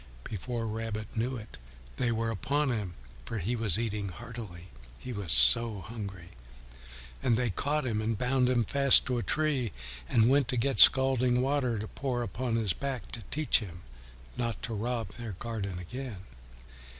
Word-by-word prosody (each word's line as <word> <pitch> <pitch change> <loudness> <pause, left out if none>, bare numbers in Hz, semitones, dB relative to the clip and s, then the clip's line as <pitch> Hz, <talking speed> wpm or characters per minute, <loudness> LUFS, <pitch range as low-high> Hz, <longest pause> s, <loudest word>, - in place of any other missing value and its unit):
Before 115 +3 -4
Rabbit 110 -1 -4
knew 120 +4 -1
it, 110 -1 -10 0.4
they 125 -1 +1
were 115 0 0
upon 135 +6 0
him, 100 -7 -3 0.3
for 115 - -5
he 105 +5 -1
was 110 -5 0
eating 105 -3 -2
heartily, 100 -4 -9 0.3
he 125 - -7
was 100 -6 -4
so 100 - +4
hungry, 100 -4 -7 0.9
and 120 -4 +2
they 125 -3 0
caught 145 +8 -1
him 110 -3 -1
and 110 0 -1
bound 125 +2 +2
him 120 -2 +3
fast 140 +3 +6
to 125 -1 0
a - - -1
tree 140 -4 0 0.4
and 115 -1 +4
went 135 0 +4
to 125 - -1
get 135 +3 0
scalding 130 -2 +6
water 130 -4 +1
to 105 +1 -4
pour 125 -1 -2
upon 120 +2 -2
his 110 -5 +1
back 135 -3 -5
to 120 - -3
teach 155 0 +2
him 90 -6 -9 0.5
not 120 -2 -2
to 115 - -3
rob 115 0 -2
their 115 0 -6
garden 100 -2 -4
again. 110 +3 -7
115 Hz, 170 wpm, -30 LUFS, 105-125 Hz, 0.9 s, fast